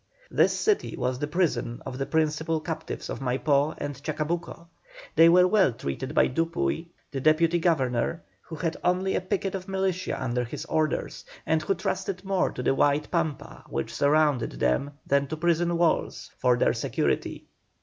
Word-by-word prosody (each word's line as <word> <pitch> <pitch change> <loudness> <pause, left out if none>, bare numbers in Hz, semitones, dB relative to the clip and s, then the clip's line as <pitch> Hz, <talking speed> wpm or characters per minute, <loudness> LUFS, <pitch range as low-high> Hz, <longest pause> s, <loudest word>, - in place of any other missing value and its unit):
This - - +3
city 425 -2 +1
was 125 0 -1
the 145 - -2
prison 150 -7 0
of 130 - -6
the 135 - -2
principal 160 0 0
captives 160 0 -5
of - - -5
Maipó 140 +3 +1
and 140 -1 -5
Chacabuco. 160 +3 -3 0.5
They 165 +1 +7
were 180 +1 +6
well 190 - +3
treated 70 -11 -5
by - - +5
Dupuy, 165 +3 -1 0.2
the 135 - -3
Deputy 160 +3 +3
Governor, 155 -2 0 0.2
who 165 - -9
had 165 +1 -2
only 185 +2 +1
a - - 0
picket 195 0 -2
of 190 0 -5
militia 190 -1 -1
under 125 -1 -1
his 120 - -6
orders, 155 -1 -1 0.2
and 160 0 +2
who 195 +5 0
trusted 190 0 -3
more 195 -1 +1
to 125 - -6
the 130 - +3
wide 145 +2 +1
Pampa 165 -4 -2
which - - -3
surrounded 145 -4 +2
them 65 - 0
than 140 0 +2
to 155 - -4
prison 170 +1 +1
walls 170 -1 0
for 125 -2 +3
their - - +3
security. - - -1
160 Hz, 170 wpm, -26 LUFS, 140-175 Hz, 0.5 s, They